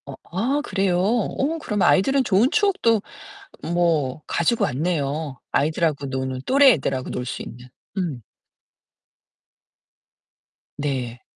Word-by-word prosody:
어 140 - -8 0.2
아 255 +10 0
그래요? 190 -7 0
어 240 - 0
그럼 210 -8 -2
아이들은 265 +10 +4
좋은 215 +3 +3
추억도 360 - +2 0.7
뭐 155 -5 +1
가지고 195 +8 +1
왔네요. 145 -1 -2
아이들하고 150 0 0
노는, 130 -1 -3
또래 275 0 +6
애들하고 135 -5 -2
놀 125 - -4
수 - - -5
있는. 125 +2 -10 0.3
음. 165 -10 -2 2.6
네. 130 -4 -3
170 Hz, 225 characters per minute, -23 LUFS, 135-225 Hz, 2.6 s, 또래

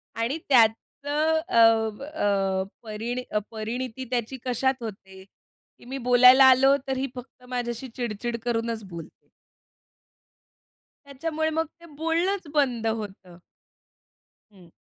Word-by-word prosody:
आणि 230 +6 -1
त्याचं 285 +6 +2
अं, 225 -2 +4
अ 195 -10 0 0.2
परिणी 230 +3 -4 0.3
परिणीती 240 +3 -5
त्याची 245 +1 -2
कशात 255 +1 0
होते 190 -3 -9 0.6
की - - -17
मी 265 +3 -5
बोलायला 250 +2 +8
आलो 265 +1 +6
तर 265 -1 -1
ही 270 +1 -1
फक्त 250 0 -11
माझ्याशी 245 0 -3
चिड-चिड 235 0 -3
करूनच 230 -2 -2
बोलते. 170 -2 -11 1.8
त्याच्यामुळे, 315 +3 -2
मग 320 +1 0
ते 340 - -15
बोलणंच 335 +4 0
बंद 250 -7 +1
होतं. 200 -5 -5 1.2
हं. 180 -4 -18
245 Hz, 110 wpm, -25 LUFS, 220-270 Hz, 1.8 s, बोलायला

